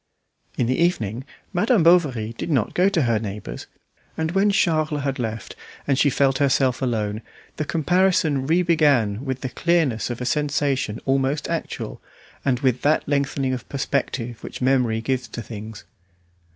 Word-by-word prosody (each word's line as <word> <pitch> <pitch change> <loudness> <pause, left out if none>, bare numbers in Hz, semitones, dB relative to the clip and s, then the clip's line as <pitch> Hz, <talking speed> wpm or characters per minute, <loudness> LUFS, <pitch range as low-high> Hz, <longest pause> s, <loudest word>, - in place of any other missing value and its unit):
In 125 - +2
the 130 +2 0
evening 130 - 0 0.3
Madame 205 +1 +3
Bovary 140 -11 +3
did 170 - -5
not 130 -9 +1
go 185 +2 +3
to 170 -6 +1
her 115 -3 +2
neighbour's, 105 - -6 0.5
and 160 0 -1
when 195 +3 +3
Charles 155 -6 +1
had 135 -1 -2
left 115 -2 -4 0.3
and 140 - +2
she 145 - +4
felt 135 -1 +2
herself 135 -2 +2
alone, 110 -4 -1 0.4
the 155 - -2
comparison 165 -4 +2
re 170 +3 +3
began 140 - +2
with 130 -2 -3
the 130 - -3
clearness 160 -8 +1
of 120 - -4
a 125 - -3
sensation 140 -5 0
almost 135 +2 0
actual, - - -4 0.4
and 130 -2 0
with 130 -3 +1
that 150 +2 +2
lengthening 140 -2 0
of 125 -3 -6
perspective 130 -4 -2
which - - -7
memory 125 -4 +2
gives 125 0 -2
to 120 - -7
things. 110 -1 -8
135 Hz, 160 wpm, -23 LUFS, 120-155 Hz, 0.5 s, she